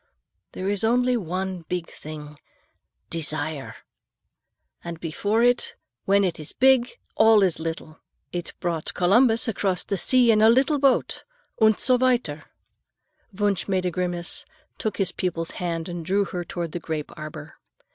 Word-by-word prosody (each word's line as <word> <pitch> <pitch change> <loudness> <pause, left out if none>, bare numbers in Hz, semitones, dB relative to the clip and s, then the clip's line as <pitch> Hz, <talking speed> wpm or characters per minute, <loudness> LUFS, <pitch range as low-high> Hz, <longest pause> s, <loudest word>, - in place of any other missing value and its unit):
There 185 - -4
is 205 0 +2
only 250 +2 +3
one 185 -2 -3
big 180 -2 -2
thing—desire. 150 0 -7 1.1
And 170 -1 -6
before 205 +8 0
it, 245 0 +2 0.3
when 200 +1 +4
it 180 -4 -1
is 155 - -8
big, 260 -1 +3 0.2
all 220 -2 +5
is 180 -4 +1
little. 160 -1 -6 0.3
It 175 -1 -5
brought 170 -3 -2
Columbus 225 +6 +4
across 195 -4 0
the 200 - -2
sea 250 +3 +4
in 215 -1 +3
a 220 - +7
little 275 +5 +3
boat, 270 -2 +2 0.4
und 220 -1 +5
so 255 -1 +3
weiter." 240 -13 +1 0.9
Wunsch 200 -2 0
made 185 -2 0
a 180 - 0
grimace, 175 -1 -2 0.4
took 215 - -2
his 190 -3 0
pupil's 170 -3 -3
hand 165 -2 -3
and 175 -2 -5
drew 195 +4 +1
her 175 0 -4
toward 170 -1 -5
the 175 - -4
grape 155 -3 -4
arbor. 155 0 -9
185 Hz, 145 wpm, -24 LUFS, 165-220 Hz, 1.1 s, a